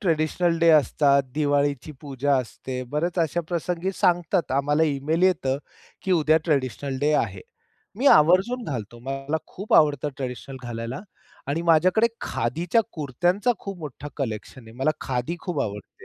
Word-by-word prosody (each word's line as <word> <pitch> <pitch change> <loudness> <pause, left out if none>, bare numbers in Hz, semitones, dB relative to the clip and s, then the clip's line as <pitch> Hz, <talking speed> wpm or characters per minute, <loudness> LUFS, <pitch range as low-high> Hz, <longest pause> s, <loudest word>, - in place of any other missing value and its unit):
Traditional 165 -1 +1
day 170 0 +4
असतात. 140 -1 +4
दिवाळीची 145 -1 0
पूजा 140 0 0
असते. 130 +1 -4
बऱ्याच 170 +5 -1
अशा 165 +1 +1
प्रसंगी 175 +1 -2
सांगतात 175 -3 +1
आम्हाला 145 +3 +2
इमेल 155 +2 0
येतं, 155 -8 +2 0.4
की 190 - 0
उद्या 155 -2 +4
ट्रेडिशनल 135 -3 -1
डे 150 +1 +2
आहे. 100 -9 0 0.6
मी 260 +6 0
आवर्जून 190 - +5
घालतो. 120 - -5
मला 135 +3 -2
खूप 200 +3 -3
आवडतं 150 -2 +4
ट्रेडिशनल 130 0 -6
घालायला 120 +2 -5 0.5
आणि 155 +4 -1
माझ्याकडे 175 +6 +4
खादीच्या 165 - 0
कुरत्यांचा 175 - 0
खूप 195 -2 -7
मोठा 145 -2 -7
कलेक्शन 120 -1 -5
आहे. - - -12
मला 135 +3 +2
खादी 130 +5 -2
खूप 175 -7 -3
आवडते. 105 -1 -7
150 Hz, 140 wpm, -24 LUFS, 135-170 Hz, 0.6 s, आवर्जून